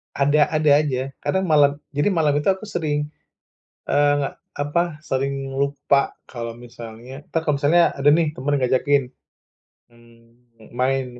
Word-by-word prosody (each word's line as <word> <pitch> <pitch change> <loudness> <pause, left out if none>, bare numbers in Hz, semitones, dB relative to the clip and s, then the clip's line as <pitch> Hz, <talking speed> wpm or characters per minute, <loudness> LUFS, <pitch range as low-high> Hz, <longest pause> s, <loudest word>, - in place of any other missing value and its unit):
Ada 145 +1 +3
ada 155 -2 +2
aja. 135 -3 -2
Kadang 190 0 -1
malam 145 -2 +4 0.2
jadi 145 +4 0
malam 155 -4 +2
itu - - -4
aku 190 +1 +1
sering, 150 -7 -2 0.8
eee, 145 -1 +2 0.3
apa, 150 +3 -1
sering 135 0 -2
lupa 140 0 +1
kalau 115 -2 -6
misalnya 120 +2 -10
entar 165 -1 -2
kalau 145 -2 +1
misalnya 170 +4 +4
ada 140 +1 +2
nih 155 0 +3
temen 145 +2 -2
yang 135 - -4
ngajakin. 140 +2 +2 0.9
Mmm, 115 0 -22
main 130 +1 0
140 Hz, 140 wpm, -22 LUFS, 130-150 Hz, 0.9 s, malam